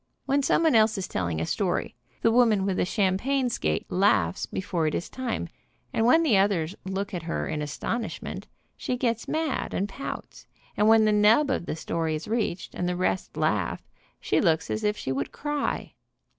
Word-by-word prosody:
When 280 Hz, +1 st, +2 dB
someone 320 Hz, +3 st, +3 dB
else 220 Hz, -1 st, +4 dB
is 190 Hz, -1 st, -3 dB
telling 85 Hz, -3 st, -2 dB
a 80 Hz, -, -1 dB
story, -, -, -1 dB, 0.3 s
the 230 Hz, -, +5 dB
woman 225 Hz, -5 st, +4 dB
with 190 Hz, -2 st, 0 dB
a -, -, +2 dB
champagne 230 Hz, +8 st, +1 dB
skate 80 Hz, -, -1 dB
laughs 100 Hz, -, +2 dB
before 175 Hz, -4 st, -2 dB
it 155 Hz, -, -1 dB
is 170 Hz, -, -4 dB
time, 245 Hz, -, -3 dB, 0.5 s
and 225 Hz, -, +2 dB
when 325 Hz, +6 st, +5 dB
the 230 Hz, -11 st, +4 dB
others 190 Hz, -4 st, +1 dB
look 195 Hz, +1 st, -3 dB
at 175 Hz, -, -3 dB
her 165 Hz, +1 st, -3 dB
in 155 Hz, -1 st, -2 dB
astonishment, 220 Hz, -, -4 dB, 0.3 s
she 250 Hz, -, -3 dB
gets 235 Hz, -3 st, -1 dB
mad 315 Hz, -3 st, -2 dB
and 200 Hz, -, 0 dB
pouts, 240 Hz, +7 st, -7 dB, 0.3 s
and 210 Hz, -, +3 dB
when 220 Hz, 0 st, +6 dB
the 215 Hz, -, +4 dB
nub 215 Hz, +7 st, +4 dB
of 175 Hz, -, -2 dB
the -, -, -2 dB
story 160 Hz, 0 st, -2 dB
is 155 Hz, -, -6 dB
reached, 215 Hz, -5 st, -2 dB
and 180 Hz, -, -2 dB
the 180 Hz, -, -1 dB
rest 185 Hz, +1 st, -1 dB
laugh, -, -, 0 dB, 0.3 s
she -, -, +1 dB
looks 160 Hz, -4 st, +1 dB
as 215 Hz, -, -2 dB
if 210 Hz, 0 st, +1 dB
she 130 Hz, -, -3 dB
would 135 Hz, +1 st, -2 dB
cry. 295 Hz, -1 st, -3 dB
205 Hz, 190 wpm, -26 LUFS, 170-235 Hz, 0.5 s, when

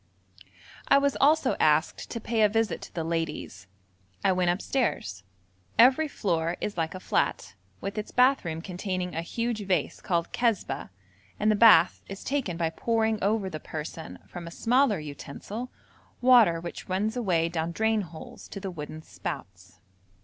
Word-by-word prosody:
I -, -, +6 dB
was 280 Hz, 0 st, +2 dB
also 290 Hz, -2 st, +4 dB
asked 155 Hz, 0 st, +2 dB
to 230 Hz, -, -4 dB
pay 225 Hz, 0 st, -1 dB
a 210 Hz, -, +6 dB
visit 225 Hz, +1 st, 0 dB
to -, -, -11 dB
the 165 Hz, -, -1 dB
ladies. 165 Hz, -, -4 dB, 0.6 s
I -, -, +5 dB
went 180 Hz, -1 st, +2 dB
upstairs. 180 Hz, -, -1 dB, 0.6 s
Every 265 Hz, +6 st, +6 dB
floor 170 Hz, -, -1 dB
is 210 Hz, -, -3 dB
like 165 Hz, 0 st, -2 dB
a -, -, -5 dB
flat, 95 Hz, -, -1 dB, 0.3 s
with 200 Hz, +2 st, -3 dB
its 210 Hz, -, -5 dB
bath 255 Hz, +2 st, +4 dB
room 165 Hz, -2 st, -4 dB
containing 185 Hz, -1 st, -3 dB
a 165 Hz, -, -2 dB
huge 230 Hz, +4 st, -3 dB
vase 180 Hz, -6 st, 0 dB
called 170 Hz, -2 st, -1 dB
kazbah, 215 Hz, -, 0 dB, 0.5 s
and 215 Hz, +1 st, +3 dB
the -, -, +3 dB
bath 200 Hz, -6 st, +6 dB
is 195 Hz, 0 st, -7 dB
taken 255 Hz, -11 st, -2 dB
by 165 Hz, -1 st, 0 dB
pouring 220 Hz, +1 st, 0 dB
over 205 Hz, 0 st, +1 dB
the 155 Hz, -5 st, -5 dB
person, 155 Hz, +1 st, -7 dB
from 175 Hz, -1 st, -8 dB
a -, -, -5 dB
smaller 240 Hz, +4 st, +2 dB
utensil, 155 Hz, -, -7 dB, 0.5 s
water 240 Hz, -9 st, +6 dB
which 170 Hz, +2 st, -8 dB
runs 205 Hz, +5 st, 0 dB
away 180 Hz, -9 st, +1 dB
down 165 Hz, 0 st, -2 dB
drain 220 Hz, +3 st, +1 dB
holes 165 Hz, -4 st, -10 dB
to 200 Hz, -, -7 dB
the 195 Hz, -1 st, -5 dB
wooden 155 Hz, -1 st, -7 dB
spouts. 95 Hz, -, -8 dB
185 Hz, 165 wpm, -27 LUFS, 165-225 Hz, 0.6 s, I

